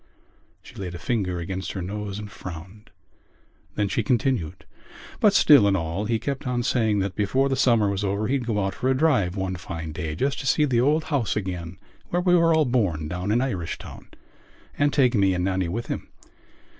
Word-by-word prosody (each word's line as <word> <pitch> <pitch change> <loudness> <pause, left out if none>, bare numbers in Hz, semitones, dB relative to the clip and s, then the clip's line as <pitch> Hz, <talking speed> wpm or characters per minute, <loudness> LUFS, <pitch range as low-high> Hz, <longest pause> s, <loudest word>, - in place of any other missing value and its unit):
She - - -14
laid 90 -3 -6
a - - -4
finger 90 -2 -2
against 95 +2 -4
her 95 - -4
nose 100 +1 -5
and 105 -1 -7
frowned: 95 +4 -10 0.9
then 105 -1 +1
she 100 - 0
continued: 115 - -1 0.5
"But 205 -2 +4
still 145 - +7
and 95 -1 +3
all 85 +5 -3
he 115 +1 +1
kept 140 +3 -4
on 120 -1 0
saying 110 -4 +1
that 95 -1 -2
before 130 +7 +1
the 135 - +1
summer 120 -5 +3
was 100 0 -1
over 100 +2 -1
he'd 130 -2 -1
go 105 -4 0
out 95 - -2
for 130 - -1
a 130 - +2
drive 130 - +2
one 95 -1 -2
fine 80 -2 -6
day 75 0 -4
just 135 - -1
to 135 - -4
see 150 +3 +3
the 120 -4 +2
old 150 +5 +2
house 130 -7 0
again 90 -3 -4 0.3
where 175 - 0
we 180 -1 +4
were 165 -1 +4
all 160 -1 +4
born 100 - 0
down 90 +4 -3
in 120 +3 +2
Irishtown 95 -11 -5 0.7
and 145 0 +2
take 130 -4 +3
me 100 -4 +3
and 90 0 -1
Nannie 95 -2 0
with 115 +7 -3
him. - - -5
105 Hz, 205 wpm, -24 LUFS, 95-130 Hz, 0.9 s, still